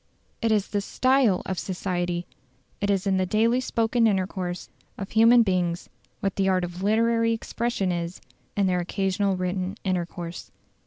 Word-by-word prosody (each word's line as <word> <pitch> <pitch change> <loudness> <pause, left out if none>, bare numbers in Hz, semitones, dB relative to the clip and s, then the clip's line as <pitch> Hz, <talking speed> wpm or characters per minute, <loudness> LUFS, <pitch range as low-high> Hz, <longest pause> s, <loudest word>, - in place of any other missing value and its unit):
It 230 - +1
is 210 -2 +1
the 205 - -1
STYLE 255 -2 +2
of 190 -2 -3
society; 175 -2 -2 0.6
it 205 - 0
is 195 -1 +1
in 195 -1 +2
the 185 - +1
daily 230 +5 +2
spoken 230 -1 +2
intercourse 185 -3 -2 0.3
of 195 - -6
human 230 +2 +6
beings 180 -4 -1 0.3
what 195 -2 -1
the 195 -1 +2
art 185 -1 +2
of 175 +1 -5
literary 230 +2 +2
expression 225 -3 -2
is 170 0 -3 0.4
in 200 - +3
their 180 -1 +1
occasional 195 +2 0
written 185 +2 -2
intercourse. 175 -2 -3
195 Hz, 155 wpm, -25 LUFS, 180-220 Hz, 0.6 s, human